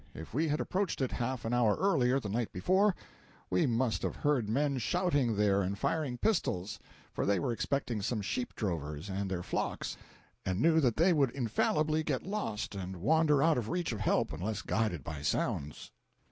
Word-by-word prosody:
If 80 Hz, -, -9 dB
we 155 Hz, +6 st, +1 dB
had 150 Hz, +1 st, 0 dB
approached 190 Hz, 0 st, -1 dB
it 130 Hz, -, 0 dB
half 125 Hz, 0 st, -3 dB
an 115 Hz, -, -1 dB
hour 115 Hz, -4 st, +3 dB
earlier 135 Hz, -9 st, +2 dB
the 115 Hz, -, -5 dB
night 115 Hz, +3 st, -2 dB
before, 190 Hz, -, +2 dB, 0.6 s
we 90 Hz, -, +3 dB
must 120 Hz, -1 st, +1 dB
have -, -, -2 dB
heard 135 Hz, -8 st, +1 dB
men 140 Hz, +3 st, +1 dB
shouting 140 Hz, -, +1 dB
there 100 Hz, -1 st, +3 dB
and 95 Hz, +1 st, -2 dB
firing 145 Hz, -1 st, -1 dB
pistols; 105 Hz, -, 0 dB, 0.3 s
for -, -, -1 dB
they 100 Hz, 0 st, +2 dB
were 130 Hz, -, -1 dB
expecting 120 Hz, -2 st, -1 dB
some 105 Hz, +1 st, -1 dB
sheep 120 Hz, +5 st, -3 dB
drovers 80 Hz, -3 st, -3 dB
and 95 Hz, 0 st, -2 dB
their 90 Hz, -2 st, -2 dB
flocks -, -, -3 dB, 0.5 s
and 95 Hz, 0 st, -1 dB
knew 160 Hz, +4 st, +4 dB
that 125 Hz, -7 st, +2 dB
they 175 Hz, +3 st, +5 dB
would 140 Hz, -5 st, +3 dB
infallibly 150 Hz, +6 st, +1 dB
get 145 Hz, -5 st, -2 dB
lost 185 Hz, -, -3 dB
and 95 Hz, -1 st, -5 dB
wander 150 Hz, -, +3 dB
out 160 Hz, -5 st, +4 dB
of 110 Hz, -, -4 dB
reach 175 Hz, -3 st, -1 dB
of 110 Hz, -, -4 dB
help 105 Hz, -, +1 dB
unless 105 Hz, +6 st, -3 dB
guided 105 Hz, -, -1 dB
by 75 Hz, 0 st, -6 dB
sounds. 75 Hz, 0 st, -2 dB
120 Hz, 190 wpm, -32 LUFS, 100-150 Hz, 0.6 s, they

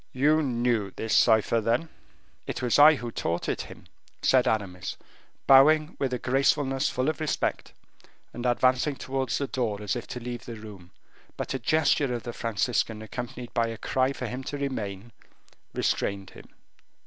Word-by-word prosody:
"You 150 Hz, +4 st, +3 dB
knew 120 Hz, -6 st, 0 dB
this 110 Hz, -, -1 dB
cipher, 110 Hz, 0 st, +4 dB
then?" 120 Hz, +9 st, 0 dB, 0.6 s
"It -, -, -4 dB
was 125 Hz, +3 st, +2 dB
I 155 Hz, +2 st, +9 dB
who 120 Hz, -3 st, -6 dB
taught 85 Hz, -5 st, -2 dB
it -, -, -1 dB
him," -, -, -11 dB, 0.4 s
said 130 Hz, -1 st, +4 dB
Aramis, 95 Hz, -5 st, -2 dB, 0.5 s
bowing 155 Hz, +4 st, +6 dB
with 135 Hz, -2 st, 0 dB
a 125 Hz, -, -1 dB
gracefulness 135 Hz, +2 st, +1 dB
full 130 Hz, +2 st, -1 dB
of 155 Hz, -, -1 dB
respect, 155 Hz, -1 st, -2 dB, 0.6 s
and 120 Hz, -, -6 dB
advancing 130 Hz, +3 st, +2 dB
towards 130 Hz, -2 st, -2 dB
the 140 Hz, -, -1 dB
door 115 Hz, -6 st, -2 dB
as 105 Hz, +4 st, -2 dB
if 120 Hz, -, -5 dB
to 125 Hz, -, -6 dB
leave 120 Hz, 0 st, -6 dB
the 120 Hz, -, -7 dB
room: 105 Hz, -5 st, -11 dB, 0.5 s
but -, -, -3 dB
a 135 Hz, -, -2 dB
gesture 145 Hz, 0 st, +2 dB
of 120 Hz, -, -5 dB
the 120 Hz, -, -6 dB
Franciscan 115 Hz, 0 st, -1 dB
accompanied 120 Hz, +2 st, -7 dB
by 115 Hz, -1 st, +1 dB
a 115 Hz, 0 st, -5 dB
cry 130 Hz, +3 st, 0 dB
for 130 Hz, -, -5 dB
him 125 Hz, +3 st, -5 dB
to 145 Hz, -, -4 dB
remain, 115 Hz, -6 st, -4 dB, 0.6 s
restrained 100 Hz, -1 st, -1 dB
him. -, -, -14 dB
125 Hz, 170 wpm, -27 LUFS, 110-135 Hz, 0.6 s, I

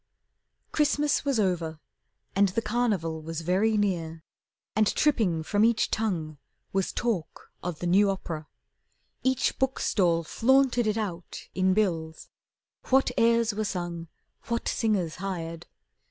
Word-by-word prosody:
Christmas 295 Hz, -1 st, +2 dB
was 275 Hz, -5 st, +1 dB
over 170 Hz, -5 st, 0 dB, 0.6 s
and 200 Hz, 0 st, +4 dB
the 210 Hz, +5 st, -1 dB
Carnival 205 Hz, -9 st, 0 dB
Was 165 Hz, +1 st, -5 dB
very 195 Hz, +6 st, +2 dB
near, 165 Hz, -6 st, -1 dB, 0.5 s
and 215 Hz, 0 st, +3 dB
tripping 205 Hz, -, +2 dB
from 205 Hz, +5 st, +1 dB
each 230 Hz, 0 st, +3 dB
tongue 165 Hz, -9 st, -2 dB, 0.3 s
Was 195 Hz, -1 st, 0 dB
talk 220 Hz, -10 st, -3 dB
of 175 Hz, -3 st, -4 dB
the 175 Hz, -, -5 dB
new 195 Hz, +4 st, +4 dB
opera. 165 Hz, -5 st, -4 dB, 0.7 s
Each 260 Hz, -1 st, +1 dB
book 265 Hz, 0 st, 0 dB
stall 170 Hz, -4 st, +2 dB
Flaunted 250 Hz, -, +3 dB
it 215 Hz, +1 st, +1 dB
out 180 Hz, -6 st, -5 dB
in 185 Hz, 0 st, +2 dB
bills, 165 Hz, -6 st, -1 dB, 0.6 s
what 265 Hz, -1 st, +4 dB
airs 230 Hz, -1 st, +3 dB
were 215 Hz, +1 st, -2 dB
sung, 175 Hz, -4 st, -4 dB, 0.4 s
What 235 Hz, 0 st, -2 dB
singers 200 Hz, -8 st, 0 dB
hired. 170 Hz, -3 st, -5 dB
195 Hz, 130 wpm, -27 LUFS, 165-230 Hz, 0.7 s, and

